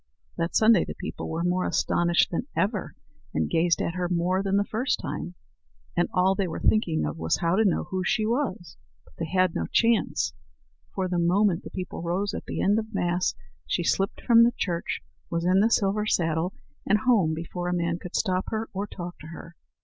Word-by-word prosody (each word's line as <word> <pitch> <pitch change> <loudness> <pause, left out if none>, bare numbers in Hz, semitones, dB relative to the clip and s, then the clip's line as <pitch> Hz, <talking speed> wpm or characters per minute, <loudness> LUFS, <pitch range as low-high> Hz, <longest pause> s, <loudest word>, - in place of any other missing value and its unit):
That 165 0 -2
Sunday 220 -4 +5
the - - -6
people - - -6
were 165 +1 -2
more 180 +1 +1
astonished 175 0 +2
than 180 +9 -2
ever, 205 0 -1 0.4
and 80 -1 +1
gazed 170 - +2
at 170 - -2
her 180 -1 -2
more 180 +2 +1
than 195 0 +1
the 200 - +3
first 245 +5 -1
time; 180 - -5 0.6
and 175 - +1
all 185 +1 +3
they 195 -1 -1
were 165 - -5
thinking 175 - +2
of 75 +2 -4
was 80 0 +1
to 180 +6 +2
know 190 - +2
who 185 -1 -3
she 215 +4 +1
was. 230 -7 -2 0.3
But - - -21
they 165 - -2
had 185 0 +2
no - - -2
chance; 230 -1 +2 0.6
for 190 -1 0
the 175 -1 -1
moment 180 +1 +2
the - - -8
people 185 -3 -6
rose 180 +4 -1
at - - -5
the - - -3
end 205 +3 +3
of 220 -1 -7
Mass 175 -1 0 0.3
she 175 - 0
slipped 195 +4 0
from 230 -2 +6
the 240 +1 +3
church, 170 -3 -2 0.3
was 170 0 -1
in 185 +2 +4
the 215 +3 +4
silver 210 -1 +1
saddle, 165 0 0 0.3
and 210 +1 +2
home 205 -11 +3
before 175 +2 -5
a - - 0
man 170 0 -1
could 180 -2 -8
stop 185 -2 +1
her 220 0 -3
or 200 +2 -3
talk 175 -2 -8
to 155 - -10
her. 165 +1 -10
185 Hz, 205 wpm, -26 LUFS, 170-205 Hz, 0.6 s, from